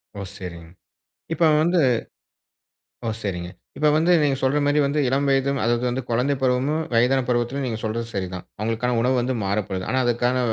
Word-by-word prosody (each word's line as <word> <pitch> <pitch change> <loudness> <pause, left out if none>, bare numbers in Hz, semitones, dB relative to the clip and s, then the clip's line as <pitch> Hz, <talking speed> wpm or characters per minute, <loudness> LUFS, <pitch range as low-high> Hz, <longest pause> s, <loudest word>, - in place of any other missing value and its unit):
ஓ - - -6 0.2
சேரிங். 85 -3 -8 0.6
இப்ப 165 +1 +1 0.2
வந்து 175 +2 +2 1.3
ஓ - - 0
சேரிங்க. 90 -3 -3 0.3
இப்ப 150 +2 +2
வந்து, 165 +3 +3
நீங்கச் 140 -2 +1
சொல்ற 135 +2 +2
மாதிரி 145 +1 +3
வந்து 140 +2 +1
இளம் 135 +2 +1
வயதும் 135 0 +2
அதாவது 120 +2 0
குழந்தை 125 +5 +1
பருவமும் 130 +5 +1
வயதான 125 +3 +4
பருவத்துலயும் 125 +3 0
நீங்கச் 115 -2 -4
சொல்றது 115 +1 -2
சரிதான். 90 -2 -4
அவங்களுக்கான 115 +3 -1
உணவு 125 +3 +2
வந்து 130 +2 -1
மாற 100 +2 0
வேண்டும். 95 +8 -1
அதுக்கான 120 +1 +1
125 Hz, 160 wpm, -23 LUFS, 115-140 Hz, 1.3 s, வயதான